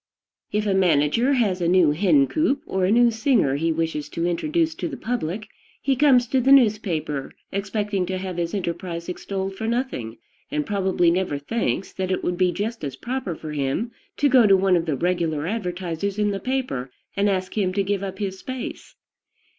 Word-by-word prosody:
If 210 +1 0
a 200 - +2
manager 185 - +3
has 205 -8 +1
a 170 - +1
new 175 -3 +5
hen 150 -4 +4
coop 295 - 0
or 190 -1 0
a 190 - +2
new 240 +1 +5
singer 225 - +2
he 165 +2 +1
wishes 160 -2 -2
to 165 - -2
introduce 310 - 0
to - - -4
the - - -6
public, 215 -3 -3 0.3
he 275 -1 +1
comes 260 -3 +5
to 265 - +2
the 265 +3 +3
newspaper, 200 - +2 0.2
expecting 200 -1 -1
to 185 0 -2
have 185 -1 -5
his 170 +2 -2
enterprise 170 -2 -4
extolled 190 +1 -4
for 220 +3 -4
nothing, 230 - -2 0.3
and 300 +1 -1
probably 190 -5 +2
never 180 -4 0
thinks 195 +6 -2
that 190 -1 -3
it 185 - -1
would 180 - 0
be 180 -1 +3
just 205 +3 -4
as 140 -3 -4
proper 240 - -4
for 155 0 -7
him 145 - -1 0.3
to 290 - +3
go 250 -5 +6
to 195 -1 +6
one 190 -1 +3
of 170 -1 0
the 150 - +1
regular 170 -3 0
advertisers 185 -1 -3
in 210 -1 +1
the 195 - -3
paper 255 - -2 0.3
and 200 +1 +2
ask 185 -1 -2
him 195 -4 +1
to 200 +1 +1
give 195 0 -1
up 190 -1 -5
his 190 -2 -4
space. 260 +3 -7
190 Hz, 195 wpm, -23 LUFS, 170-225 Hz, 0.3 s, go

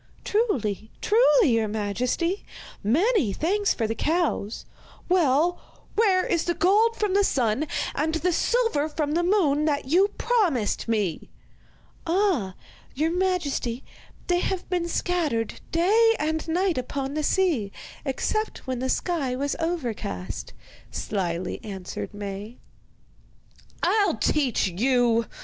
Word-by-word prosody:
'Truly, 220 - 0
truly, 445 - +4
your 225 -1 +2
majesty. 240 - -1 0.4
Many 305 - +2
thanks 400 - +1
for 230 - -1
the 220 - -1
cows.' 310 - -1 0.4
'Well, 345 -1 +3 0.4
where 395 -4 +3
is 350 -10 0
the 345 - 0
gold 430 +6 +3
from 420 -4 0
the 405 +1 +4
sun 260 - +1 0.3
and 315 +2 -1
the 340 +3 +1
silver 455 -10 +1
from 300 -1 -2
the 335 +3 +2
moon 340 -6 +2
that 295 -2 0
you 355 +9 +4
promised 345 - +1
me?' 210 -8 -1 0.8
'Ah, 330 - +1 0.4
your 315 +4 +1
majesty, 340 -9 -1 0.4
they 355 -1 +2
have 370 0 -2
been 350 -1 0
scattered 315 -12 -1
day 440 +7 +4
and 315 +1 -2
night 350 -2 +1
upon 270 +2 -4
the 305 - -1
sea, 300 - +1 0.3
except 430 +10 -2
when 255 -2 -3
the 260 +1 -2
sky 280 -5 -1
was 280 +2 -1
overcast,' 245 - -4 0.4
slyly 180 -3 -3
answered 190 -4 -6
Maie. 205 +2 -7 1.3
'I'll 420 -2 +3
teach 270 -9 +1
you! 230 +3 +2
305 Hz, 125 wpm, -25 LUFS, 230-370 Hz, 1.3 s, truly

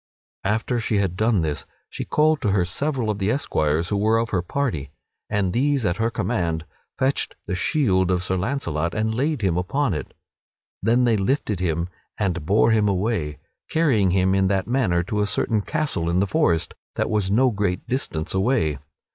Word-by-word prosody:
After 110 +4 0
she 110 -2 0
had 95 -3 0
done 110 -1 +2
this 75 -2 -3 0.2
she - - -5
called 155 0 +2
to 105 - +1
her 95 -3 +2
several 125 - -1
of 105 - -4
the 100 +1 0
esquires 80 - 0
who 105 - 0
were 110 +3 +3
of 115 0 -1
her 90 - +1
party, 90 - -2 0.4
and 100 -4 0
these 140 -1 +1
at 85 -1 0
her 115 0 +1
command 85 -9 -1 0.3
fetched 135 +2 0
the 90 - -3
shield 95 - +2
of 90 -1 +1
Sir 95 +1 -1
Launcelot 85 - -1
and 110 +1 0
laid 135 +1 -1
him 90 -3 +2
upon 115 +6 0
it. 75 -4 -6 0.7
Then 115 +5 +3
they 115 -3 +3
lifted 105 -2 0
him 85 -1 0 0.3
and 85 -6 -1
bore 110 +4 +4
him 110 -2 +3
away, 95 -6 -1 0.3
carrying 130 - +3
him 95 +1 +2
in 95 0 +3
that 95 -1 +1
manner 110 -9 +1
to 105 +4 -1
a 105 - +1
certain 105 +1 +1
castle 140 - -1
in 85 +2 +2
the 100 - +3
forest 85 - +1 0.2
that - - -1
was 105 -3 +1
no 125 +5 +4
great 100 -4 -2
distance 105 - -2
away. 95 - +1
100 Hz, 190 wpm, -23 LUFS, 90-120 Hz, 0.7 s, bore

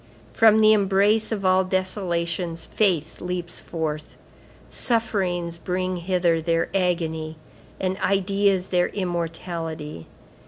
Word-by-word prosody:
From 220 -1 +5
the 215 0 +7
embrace 205 +2 +3
of 200 -3 -2
all 185 0 +4
desolations 175 -3 -2
faith 175 -7 0
leaps 180 -1 -4
forth. 155 -2 -5 0.5
Sufferings 180 -7 -1
bring 185 +1 -2
hither 175 -2 +1
their 165 0 0
agony 165 -4 -1 0.4
and 190 0 -1
ideas 195 0 +1
their 180 -1 +2
immortality. 165 - -4
180 Hz, 105 wpm, -24 LUFS, 170-195 Hz, 0.5 s, the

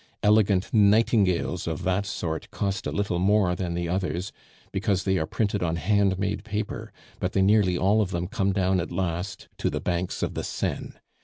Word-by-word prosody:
Elegant 105 -3 +3
'nightingales' 100 -5 +3
of 80 +1 -3
that 95 +2 0
sort 80 -4 -4
cost 100 -1 -2
a - - -2
little 100 -4 -1
more 95 -1 +3
than 90 -2 -3
the 85 0 -2
others, 90 +1 -2 0.4
because 95 -3 0
they 95 -1 +1
are 80 - -2
printed 100 +2 -1
on 85 -2 0
hand 100 +1 +2
made 100 +1 -2
paper, 105 -1 -4 0.3
but 90 - -2
they 95 - +2
nearly 100 -3 +4
all 100 +4 +3
of 100 - 0
them 85 -1 -2
come 100 -2 0
down 95 -1 +1
at 85 - -4
last 90 +1 -3
to - - +1
the - - -2
banks 90 0 -2
of - - -1
the - - -3
Seine. - - -3
95 Hz, 190 wpm, -26 LUFS, 90-100 Hz, 0.4 s, nearly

